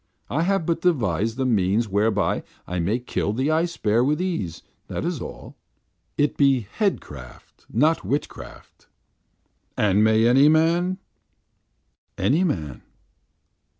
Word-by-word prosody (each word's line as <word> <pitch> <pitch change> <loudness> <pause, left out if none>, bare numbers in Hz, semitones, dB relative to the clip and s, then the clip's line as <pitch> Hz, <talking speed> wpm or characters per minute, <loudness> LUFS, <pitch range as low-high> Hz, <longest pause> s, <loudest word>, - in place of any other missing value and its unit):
I 145 - 0
have 190 -1 +1
but 165 0 -1
devised 115 - 0
a 130 - +1
means 110 -1 +1
whereby 105 +1 +1 0.2
I 90 0 -4
may 95 +8 0
kill 120 -4 -2
the 130 +6 0
ice 165 +2 0
bear 110 +3 +2
with 150 +4 +1
ease, 165 - -3 0.2
that - - -4
is - - -3
all. - - -9 0.6
It 145 0 +1
be 135 -5 +3
headcraft, 70 - -4
not 155 +8 +2
witchcraft." 145 +2 -6 0.9
"And 105 0 +3
may 110 +1 +4
any 135 +5 +6
man?" 170 +4 +2 1.2
"Any 160 +8 +2
man." 80 - -3
125 Hz, 125 wpm, -23 LUFS, 105-160 Hz, 1.2 s, any